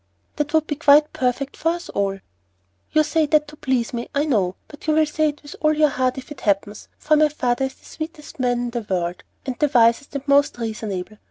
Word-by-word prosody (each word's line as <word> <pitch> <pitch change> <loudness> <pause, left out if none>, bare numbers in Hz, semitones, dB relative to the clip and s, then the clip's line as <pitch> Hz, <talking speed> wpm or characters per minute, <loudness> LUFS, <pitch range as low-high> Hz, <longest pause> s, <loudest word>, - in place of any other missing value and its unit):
"That 295 -1 -1
would 315 -1 +3
be 295 -2 -3
quite 295 0 +5
perfect 260 +2 -1
for 325 - 0
us 345 0 -7
all." 195 -1 -1 0.7
"You 310 - +4
say 310 0 +1
that 300 0 +3
to 300 - -12
please 260 -5 -1
me, 235 0 -4
I 285 +2 +2
know, 195 -11 +1
but 295 +1 -13
you 310 - +3
will 315 0 +4
say 305 +1 +1
it 295 0 -9
with 290 - -10
all 305 0 +4
your 305 0 +4
heart 255 -1 0
if 265 +2 -9
ever - - -2
it 285 - -16
happens, 205 0 -1
for 305 - +2
my 305 0 +4
father 265 -3 0
is 265 - -6
the - - -24
sweetest 310 -3 -8
man 245 -1 +1
in 245 - -2
the 240 0 -2
world, 175 -1 -2 0.2
and 260 -3 -4
the 295 - +3
wisest 235 +3 +3
and 280 +1 -4
most 280 -1 +3
reasonable. 215 -3 -5
280 Hz, 240 wpm, -22 LUFS, 235-300 Hz, 0.7 s, quite